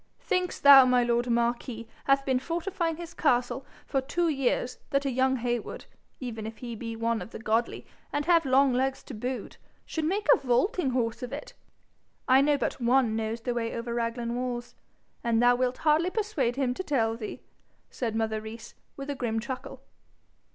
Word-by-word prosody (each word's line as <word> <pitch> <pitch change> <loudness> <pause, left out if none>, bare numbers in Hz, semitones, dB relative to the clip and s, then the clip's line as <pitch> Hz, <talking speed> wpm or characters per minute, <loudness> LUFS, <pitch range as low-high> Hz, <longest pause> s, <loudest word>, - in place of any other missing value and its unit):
'Thinks 365 -1 -1
thou 280 -1 +10
my 250 -1 +3
lord 240 +1 +1
marquis 235 0 -1 0.2
hath 275 0 +3
been 260 -2 +2
fortifying 340 +2 -2
his 345 0 -8
castle 255 -3 +1 0.2
for 270 - 0
two 340 +6 0
years 255 -3 0
that 280 -1 0
a 275 - +1
young 260 +1 +2
Heywood, 240 -2 -3 0.3
even 225 -4 -5
if 220 - -8
he 240 -2 -6
be 230 +1 -5
one 230 0 -1
of - - -7
the - - -8
godly, 225 +2 -1 0.3
and 290 0 -1
have 335 -1 +4
long 270 -1 +4
legs 265 +2 0
to - - -9
boot, 245 +1 -5 0.3
should 320 -1 -3
make 395 +6 0
a - - +4
vaulting 270 - +1
horse 235 -3 -1
of 250 - -5
it? - - -7 0.7
I 265 +1 +6
know 290 +1 +3
but 260 - -3
one 240 -2 +3
knows 225 +1 -2
the 245 +1 -2
way 230 -1 -2
over 235 0 -4
Raglan 235 0 -2
walls, 245 -1 -4 0.5
and 230 -1 +2
thou 245 +1 +5
wilt 255 0 0
hardly 315 +3 +3
persuade 370 - -1
him 265 -2 0
to 375 - -5
tell 225 -9 +1
thee,' 225 -2 -7 0.5
said 230 -4 -3
mother 220 -1 -1
Rees, 220 +1 -9 0.2
with 275 +1 -4
a - - -1
grim 235 -4 -2
chuckle. 260 +2 -7
250 Hz, 185 wpm, -28 LUFS, 235-275 Hz, 0.7 s, thou